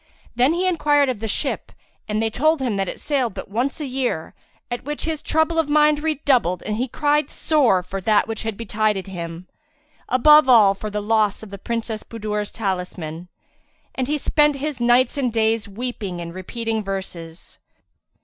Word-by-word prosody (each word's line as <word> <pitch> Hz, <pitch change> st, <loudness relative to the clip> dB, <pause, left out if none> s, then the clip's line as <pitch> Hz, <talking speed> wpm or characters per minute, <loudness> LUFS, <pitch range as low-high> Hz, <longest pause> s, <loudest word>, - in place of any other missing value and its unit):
Then 255 Hz, +6 st, +3 dB
he 355 Hz, +2 st, 0 dB
enquired 295 Hz, -6 st, +3 dB
of 245 Hz, -5 st, -2 dB
the 225 Hz, -, -3 dB
ship 205 Hz, -, -2 dB, 0.4 s
and 210 Hz, 0 st, -1 dB
they 225 Hz, -, 0 dB
told 310 Hz, +7 st, +2 dB
him 250 Hz, -5 st, -1 dB
that 195 Hz, -1 st, -1 dB
it -, -, -7 dB
sailed 260 Hz, -8 st, -1 dB
but -, -, -8 dB
once 250 Hz, +8 st, -1 dB
a 300 Hz, -, -3 dB
year, 250 Hz, -, -2 dB, 0.4 s
at 240 Hz, -, -3 dB
which 295 Hz, +2 st, -4 dB
his 315 Hz, -2 st, -2 dB
trouble 320 Hz, +1 st, +1 dB
of 315 Hz, -2 st, 0 dB
mind 300 Hz, 0 st, +4 dB
redoubled 265 Hz, -, +1 dB
and 210 Hz, 0 st, -3 dB
he 250 Hz, +3 st, -1 dB
cried 295 Hz, +4 st, +1 dB
sore 250 Hz, -, +2 dB
for 190 Hz, +2 st, -5 dB
that 210 Hz, +2 st, +3 dB
which 225 Hz, -1 st, -4 dB
had 225 Hz, -2 st, -4 dB
betided 215 Hz, -3 st, -1 dB
him, 170 Hz, -2 st, -7 dB, 0.6 s
above 300 Hz, +2 st, +6 dB
all 215 Hz, -5 st, +7 dB
for 210 Hz, +2 st, -6 dB
the 210 Hz, 0 st, -3 dB
loss 215 Hz, -1 st, +1 dB
of 210 Hz, -, -11 dB
the 200 Hz, -, -8 dB
Princess 225 Hz, 0 st, -3 dB
Budur's 210 Hz, -2 st, -4 dB
talisman, 180 Hz, -5 st, -4 dB, 0.7 s
and 260 Hz, -1 st, -2 dB
spent 295 Hz, +1 st, +3 dB
his 285 Hz, -1 st, -4 dB
nights 245 Hz, +3 st, +3 dB
and 250 Hz, -3 st, 0 dB
days 225 Hz, -1 st, +1 dB
weeping 205 Hz, -4 st, -5 dB
and 170 Hz, 0 st, -6 dB
repealing 220 Hz, +4 st, -3 dB
verses. 180 Hz, -4 st, -7 dB
225 Hz, 180 wpm, -22 LUFS, 200-280 Hz, 0.7 s, all